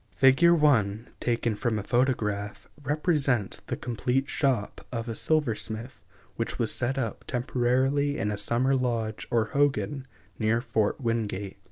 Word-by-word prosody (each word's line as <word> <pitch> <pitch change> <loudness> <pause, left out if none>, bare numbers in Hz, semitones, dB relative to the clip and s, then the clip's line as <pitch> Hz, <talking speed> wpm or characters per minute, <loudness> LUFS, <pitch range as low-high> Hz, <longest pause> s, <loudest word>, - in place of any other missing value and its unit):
Fig. 135 +4 +5
1, 125 -10 +3
taken 115 -2 0
from 115 0 -1
a 105 - -3
photograph, 105 -5 -1
represents 145 - 0
the - - -3
complete 125 +3 -1
shop 130 -8 -1
of 115 -1 -3
a 115 - -2
silversmith, 120 -4 -1 0.3
which - - -2
was - - +1
set 130 +3 -1
up 115 -5 -3
temporarily 130 +3 +1
in 105 +2 -1
a - - -1
summer 120 +6 +1
lodge 115 -4 -2
or 115 -2 +2
hogan, 140 -1 +1 0.3
near 110 +1 +2
Fort 115 -2 0
Wingate. 105 -5 -2
120 Hz, 140 wpm, -27 LUFS, 110-135 Hz, 0.3 s, Fig